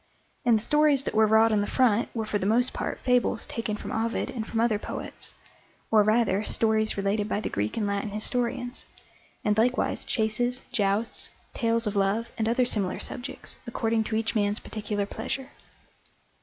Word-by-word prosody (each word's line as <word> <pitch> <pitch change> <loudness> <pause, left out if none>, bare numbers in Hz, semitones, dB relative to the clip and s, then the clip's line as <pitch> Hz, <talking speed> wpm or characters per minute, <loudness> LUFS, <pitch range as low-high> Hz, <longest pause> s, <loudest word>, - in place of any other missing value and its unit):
And 235 -2 +5
the 215 - -3
stories 295 -1 +3
that - - -3
were 220 0 +5
wrought 220 +1 +5
on 210 -1 +3
the 205 - -1
front 235 -4 +2
were 225 -1 -1
for 210 -1 -1
the 190 - -1
most 245 +4 +3
part - - -3
fables 245 -2 +2
taken 220 -2 -3
from - - -7
Ovid 230 +1 -1
and 225 -3 -4
from 225 - -2
other 225 -3 +2
poets, - - -6 0.6
or 220 -1 +6
rather, 215 -1 +2
stories 220 -1 +2
related 205 +1 0
by - - 0
the - - -4
Greek 105 - -2
and 215 - 0
Latin 200 +1 -1
historians, 245 +4 -2 0.6
and 210 -1 +3
likewise 245 +3 +1
chases, 240 +3 0
jousts, 205 +2 0 0.2
tales 230 -1 +1
of 210 -1 -2
love, 200 +4 +1
and 220 0 0
other 245 +2 +3
similar 200 -6 0
subjects, 270 +1 -6
according 225 -1 0
to 220 - -2
each 225 0 0
man's 205 -2 +1
particular 210 -1 -3
pleasure. 260 +6 -4
220 Hz, 180 wpm, -27 LUFS, 210-240 Hz, 0.6 s, or